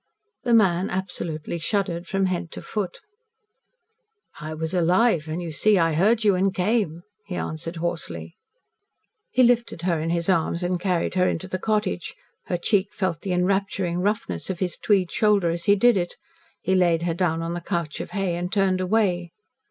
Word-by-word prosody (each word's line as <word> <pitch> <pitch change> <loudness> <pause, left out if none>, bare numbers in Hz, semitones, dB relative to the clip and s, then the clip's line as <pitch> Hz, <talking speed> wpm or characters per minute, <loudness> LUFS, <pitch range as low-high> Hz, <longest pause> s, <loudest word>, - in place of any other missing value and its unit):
The 240 -2 +3
man 190 -3 +3
absolutely 170 -3 -4
shuddered 180 -1 -1
from 195 0 +1
head 180 -2 -2
to - - -6
foot. 205 -4 -4 1.4
"I 155 0 -5
was 160 +2 -3
alive, 180 0 +3
and 160 +3 -3
you 165 - -5
see 210 +6 +3
I 165 -2 +2
heard 215 +8 +3
you 205 -2 +5
and 190 +1 +2
came," 185 -3 0 0.2
he 185 - -4
answered 165 +1 -4
hoarsely. 155 - -4 1.0
He 255 - +3
lifted 235 -7 +2
her 175 -3 +1
in 160 +1 -2
his 170 0 0
arms 170 -1 +1
and 175 0 -1
carried 180 -3 0
her 185 -1 +3
into 185 - -3
the 185 0 -3
cottage. 210 -4 -1 0.3
Her 175 - 0
cheek 195 +3 +1
felt 185 -5 -2
the 190 - -2
enrapturing 185 -1 0
roughness 185 - -2
of 190 - -2
his 180 -2 -2
tweed 190 -5 +1
shoulder 205 -6 +3
as 170 0 -3
he 200 - +5
did 240 +3 +5
it. 175 -2 -2 0.5
He 190 - +1
laid 175 -3 +3
her 170 -1 0
down 165 -2 0
on 165 +1 -3
the 175 - -4
couch 170 -2 -3
of - - -7
hay 195 -4 -1
and 180 +1 -3
turned 195 -3 +2
away. 185 -3 +1
180 Hz, 185 wpm, -24 LUFS, 170-195 Hz, 1.4 s, you